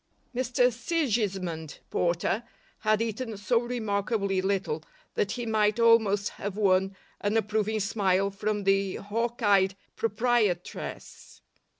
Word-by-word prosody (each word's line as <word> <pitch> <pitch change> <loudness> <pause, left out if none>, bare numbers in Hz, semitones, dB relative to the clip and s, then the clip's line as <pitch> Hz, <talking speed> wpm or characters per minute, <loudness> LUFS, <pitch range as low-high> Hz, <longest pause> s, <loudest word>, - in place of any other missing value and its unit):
Mr 250 0 +2
Sigismund 205 - -1
Porter 175 +5 +1 0.4
had 215 0 +2
eaten 225 0 -4
so 230 +4 +2
remarkably 210 -4 -1
little 190 -5 -1 0.3
that 200 - 0
he 240 -1 -4
might 215 0 +2
almost 220 -3 +4
have 205 0 -6
won 195 -1 +2 0.2
an 205 +2 +1
approving 215 0 0
smile 200 -1 +1
from 205 +1 -2
the 195 -1 +2
hawk 230 +4 -3
eyed 195 -2 +4 0.2
proprietress. 220 -5 -2
210 Hz, 110 wpm, -28 LUFS, 195-230 Hz, 0.4 s, almost